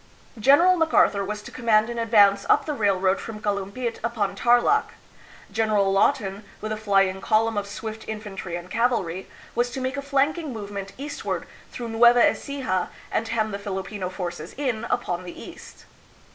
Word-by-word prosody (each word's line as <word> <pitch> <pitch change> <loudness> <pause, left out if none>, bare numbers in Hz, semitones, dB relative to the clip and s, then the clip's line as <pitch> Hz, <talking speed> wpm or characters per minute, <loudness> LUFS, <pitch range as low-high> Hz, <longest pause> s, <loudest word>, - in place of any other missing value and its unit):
General 315 - +6
MacArthur 315 -11 +3
was 210 +1 -5
to - - -10
command 220 -3 +2
an 235 0 -4
advance 205 -3 +4
up - - +4
the 300 - -2
railroad 195 -5 +1
from 220 -2 -7
Kalumpit 205 +4 -3
upon 220 -4 -1
Tarlak; 240 - +3 0.6
General 210 -2 +2
Lawton, 195 +1 +1 0.2
with 215 - -5
a - - 0
flying 195 -3 +2
column 225 +2 +2
of 205 -1 -2
swift 220 +2 -7
infantry 205 -5 -5
and 175 +1 -8
cavalry, 215 -7 0 0.3
was 240 +1 +1
to 245 - -5
make 260 +2 -2
a - - -2
flanking 280 +2 0
movement 200 -3 -6
eastward 285 +2 -4 0.3
through 235 -2 -6
Nueva 235 +1 +6
Ecija 255 -11 -2 0.2
and 225 - -1
hem 220 -1 -1
the 200 - -4
Filipino 195 -1 -4
forces 180 -2 -6
in 245 -5 -2
upon 185 -8 -1
the 175 - -9
east. - - -12
215 Hz, 160 wpm, -24 LUFS, 195-240 Hz, 0.6 s, General